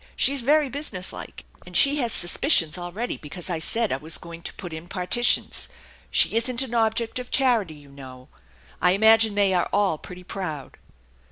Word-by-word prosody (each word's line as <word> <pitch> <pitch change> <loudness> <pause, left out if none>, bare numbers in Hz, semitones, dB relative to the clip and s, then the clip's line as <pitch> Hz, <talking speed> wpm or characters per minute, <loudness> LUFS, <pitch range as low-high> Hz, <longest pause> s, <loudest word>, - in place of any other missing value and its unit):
She's 275 0 +2
very 295 +4 +3
businesslike, 255 -10 -5 0.2
and 180 -1 -3
she 280 +1 +5
has 240 -5 -1
suspicions 175 - +3
already 180 +7 -5
because 175 +4 -8
I 165 - -2
said 225 +7 0
I - - 0
was 155 +4 -1
going 170 0 -11
to - - -6
put 175 -3 -8
in 160 +2 -8
partitions. 195 +7 +1 0.4
She - - +3
isn't 240 +2 +2
an 250 -3 -8
object 225 +1 0
of 250 - -8
charity, 235 - +1
you 145 -1 -17
know. 130 -2 -12 0.5
I 180 - +4
imagine 220 +1 +4
they 200 -2 +2
are 175 -1 0
aU 200 -6 +1
pretty 180 0 -11
proud." 175 -7 -7
195 Hz, 175 wpm, -24 LUFS, 170-235 Hz, 0.5 s, she